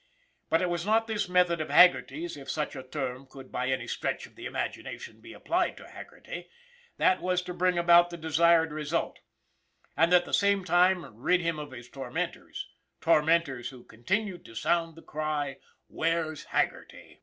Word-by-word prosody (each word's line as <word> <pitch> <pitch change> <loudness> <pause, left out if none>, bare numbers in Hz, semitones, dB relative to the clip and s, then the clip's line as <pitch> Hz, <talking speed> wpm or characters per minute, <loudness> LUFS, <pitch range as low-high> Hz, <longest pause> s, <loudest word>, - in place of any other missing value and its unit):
But 165 +2 +3
it 180 - +1
was 170 -1 -2
not 220 +3 +2
this 210 -4 -2
method 180 -2 +3
of 155 - -4
Haggerty's, 170 0 +4
if 140 -2 -10
such 150 +2 -2
a 130 - -5
term 130 -1 -5
could 135 -1 -12
by 125 - -2
any 130 0 -1
stretch - - -3
of - - -17
the - - -6
imagination - - -5
be - - -12
applied - - -1
to - - -12
Haggerty, - - -10 0.5
that 185 - +3
was 180 0 0
to 180 - -6
bring 180 0 +1
about 175 0 +6
the 170 - -7
desired 160 +1 +3
result, 155 +2 -2 0.8
and 165 +1 +3
at 175 -1 +5
the - - -10
same 200 -1 +3
time 180 0 +3
rid 175 +10 +2
him 165 -2 -1
of 150 - -6
his 120 -2 -10
tormentors 130 -1 -5 0.3
tor 160 -1 +4
mentors 150 -6 +1
who 125 -3 -13
continued 185 - -3
to 115 - -13
sound 165 +6 0
the 165 - -14
cry, 150 -2 -3
" - - -44
Where's 160 -2 -1
Haggerty - - -3
165 Hz, 180 wpm, -28 LUFS, 140-180 Hz, 0.8 s, about